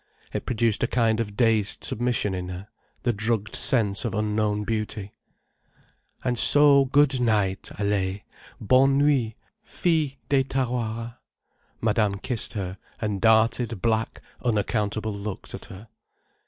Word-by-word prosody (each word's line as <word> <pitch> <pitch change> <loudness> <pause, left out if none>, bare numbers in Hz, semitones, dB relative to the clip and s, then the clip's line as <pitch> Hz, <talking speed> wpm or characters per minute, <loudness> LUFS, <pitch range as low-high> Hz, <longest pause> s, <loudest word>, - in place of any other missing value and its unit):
It - - -4
produced 115 -2 +1
a - - +2
kind 115 -2 +1
of 105 -3 -4
dazed 110 -4 +2
submission 120 -4 0
in 90 -1 -5
her, 90 +3 -8 0.3
the 120 - +1
drugged 110 0 -2
sense 105 -5 +3
of 115 -2 -3
unknown 105 0 -1
beauty. 105 -2 -4 1.1
"And 125 -2 -1
so 145 -1 +7
good 135 -1 +2
night, 105 -5 0
Allaye—bonne 105 +6 0
nuit, 135 -6 +1 0.3
fille 160 -9 -1
des 135 -2 +2
Tawara." 120 -3 -3 0.6
Madame 105 -2 +1
kissed 115 +4 -2
her, 95 -3 -5 0.2
and 105 -4 -3
darted 115 0 +2
black, 115 -1 -1 0.2
unaccountable 110 -1 -1
looks 100 0 -6
at - - -8
her. 100 +4 -12
110 Hz, 125 wpm, -24 LUFS, 105-125 Hz, 1.1 s, so